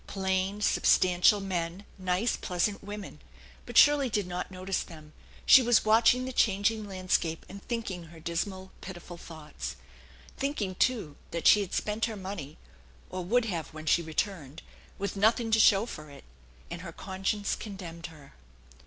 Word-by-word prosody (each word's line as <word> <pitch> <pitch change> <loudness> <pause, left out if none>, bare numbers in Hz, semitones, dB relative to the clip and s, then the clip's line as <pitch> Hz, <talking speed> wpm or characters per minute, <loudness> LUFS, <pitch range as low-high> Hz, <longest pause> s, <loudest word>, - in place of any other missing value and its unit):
Plain, 190 +1 -1
substantial 185 -1 +4
men, 185 0 -3
nice, 185 +5 0
pleasant 195 +3 -2
women; 205 0 -8 0.5
but - - -3
Shirley 290 -3 +6
did 205 -3 0
not 180 0 -4
notice 185 0 -2
them; 155 -2 -11 0.3
she 265 - +9
was 240 -3 +3
watching 230 +3 +4
the 260 - -5
changing 210 0 +1
landscape 185 -4 -1
and 195 +2 -10
thinking 205 -8 -4
her 165 0 -14
dismal, 185 +3 -4
pitiful 175 -1 -9
thoughts. 150 - -8 0.6
Thinking, 265 -9 -2
too, 195 - 0
that 170 - -4
she 210 - +7
had 195 - -4
spent 215 +2 0
her 225 -2 -5
money 185 -7 -7 0.5
or 185 0 -4
would 235 +6 +2
have 170 -8 -3
when 155 0 -8
she 170 - +3
returned, 160 -2 -4 0.3
with 200 0 -3
nothing 225 +3 +2
to 220 - +4
show 205 -1 +6
for 155 -10 -9
it, 140 - -13 0.5
and 170 - -5
her 175 -2 -7
conscience 195 +3 -2
condemned 175 -5 -8
her. 150 -4 -15
190 Hz, 155 wpm, -29 LUFS, 170-210 Hz, 0.6 s, she